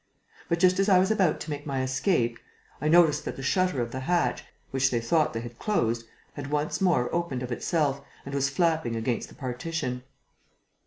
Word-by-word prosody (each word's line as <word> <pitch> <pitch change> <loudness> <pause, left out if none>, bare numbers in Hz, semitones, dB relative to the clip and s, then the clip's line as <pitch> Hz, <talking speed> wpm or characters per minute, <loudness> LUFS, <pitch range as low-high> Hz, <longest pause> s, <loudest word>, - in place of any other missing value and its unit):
But, 170 - +2
just 185 +1 +4
as 195 +1 +3
I 190 - +7
was 190 +3 +3
about 190 -7 +2
to 155 - -5
make 145 +1 -5
my 135 -2 -1
escape, 130 - 0 0.4
I 150 - 0
noticed 155 -2 +5
that - - -4
the 135 - -7
shutter 180 -3 +1
of 115 - -6
the 130 - -4
hatch, 175 +6 0 0.3
which 135 0 +2
they 120 - 0
thought 150 +7 +2
they 115 - -4
had 120 0 -9
closed, 115 - 0 0.3
had 140 -1 -6
once 150 +5 -1
more 170 -10 +2
opened 170 -8 -1
of 125 - -5
itself 140 +1 0 0.2
and 140 - -7
was 140 0 +1
flapping 160 -5 +1
against 115 +1 -2
the - - -15
partition. 125 0 -3
140 Hz, 200 wpm, -27 LUFS, 125-170 Hz, 0.4 s, I